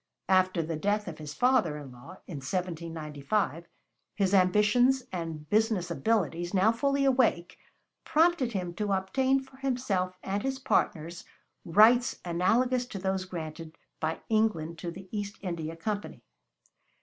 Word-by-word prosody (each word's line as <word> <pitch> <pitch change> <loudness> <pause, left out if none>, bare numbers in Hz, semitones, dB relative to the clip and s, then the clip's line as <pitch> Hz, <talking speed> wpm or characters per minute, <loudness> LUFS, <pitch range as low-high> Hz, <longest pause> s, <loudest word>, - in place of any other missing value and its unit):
After 185 -2 +3
the 160 0 -3
death 205 +5 0
of 165 -3 -7
his 150 -1 -7
father 245 - +2
in 145 -3 -9
law, 125 +9 -12
in 165 - -7
1795, 165 +1 -3 0.5
his 195 -2 +1
ambitions 210 +8 +4
and 165 -4 -5
business 210 -2 +1
abilities, 175 -3 0
now 195 +4 +5
fully 275 +4 +1
awake, 250 -10 +2 0.4
prompted 315 -6 +2
him 180 -3 -3
to 205 +2 -1
obtain 260 +8 +1
for 265 0 -16
himself 220 -9 -1
and 200 +1 -2
his 270 +2 -2
partners 170 - -1 0.4
rights 225 +7 +5
analogous 240 +9 +1
to 205 - -7
those 190 0 -1
granted 165 -2 -7 0.2
by 160 0 -2
England 195 -8 0
to 170 - -4
the 190 +3 -9
East 205 0 -4
India 165 -3 -4
Company. 205 +5 -4
190 Hz, 135 wpm, -29 LUFS, 165-225 Hz, 0.5 s, now